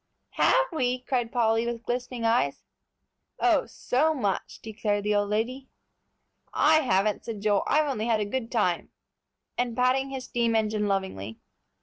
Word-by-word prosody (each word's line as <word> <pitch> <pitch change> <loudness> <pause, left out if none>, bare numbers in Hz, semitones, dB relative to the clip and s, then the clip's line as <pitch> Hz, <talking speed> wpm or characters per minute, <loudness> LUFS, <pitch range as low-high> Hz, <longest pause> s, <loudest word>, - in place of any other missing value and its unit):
"Have - - +3
we?" 255 -5 0
cried 245 -3 -1
Polly, 230 -1 +2
with 235 -1 -4
glistening 245 -1 -3
eyes. 225 - +1 0.8
"Oh, - - +3
so 310 +5 0
much!" 200 -9 -2
declared 210 -2 -2
the 210 0 +1
old 205 0 +1
lady. 250 +6 -2 0.9
"I 310 +1 +5
haven't," 215 -7 +1
said 220 -3 -6
Joel; 205 -1 +2
"I've 305 0 +3
only 230 -5 -2
had 225 -2 +2
a 210 - 0
good 230 +2 -4
time," 195 -7 0 0.7
and 245 -2 -1
patting 255 +2 +2
his 265 -1 -5
steam 235 -2 0
engine 215 -1 +1
lovingly. 190 - -3
230 Hz, 150 wpm, -27 LUFS, 210-255 Hz, 0.9 s, I